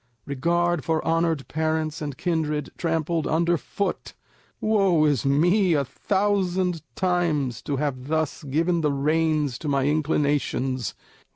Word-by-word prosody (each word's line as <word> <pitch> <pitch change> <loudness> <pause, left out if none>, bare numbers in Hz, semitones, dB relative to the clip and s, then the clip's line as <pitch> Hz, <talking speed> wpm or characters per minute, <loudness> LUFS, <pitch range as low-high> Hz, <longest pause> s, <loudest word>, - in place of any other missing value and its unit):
Regard 170 +3 0
for 160 -1 -1
honoured 165 -3 +1
parents 155 0 -1
and 145 -3 -4
kindred 155 -4 -1
trampled 165 -1 -1
under 170 +2 +2
foot! 200 +5 -4 0.4
Woe 195 -7 +3
is 145 -5 +1
me 175 +7 +3
a 140 -2 +1
thousand 190 -1 0
times 160 -10 0
to 145 - -2
have 130 -3 -3
thus 155 -1 -1
given 165 +5 +1
the 150 -2 +1
reins 150 -1 +1
to 155 - -6
my 140 -2 +1
inclinations! 145 -4 0
160 Hz, 125 wpm, -24 LUFS, 145-170 Hz, 0.4 s, Woe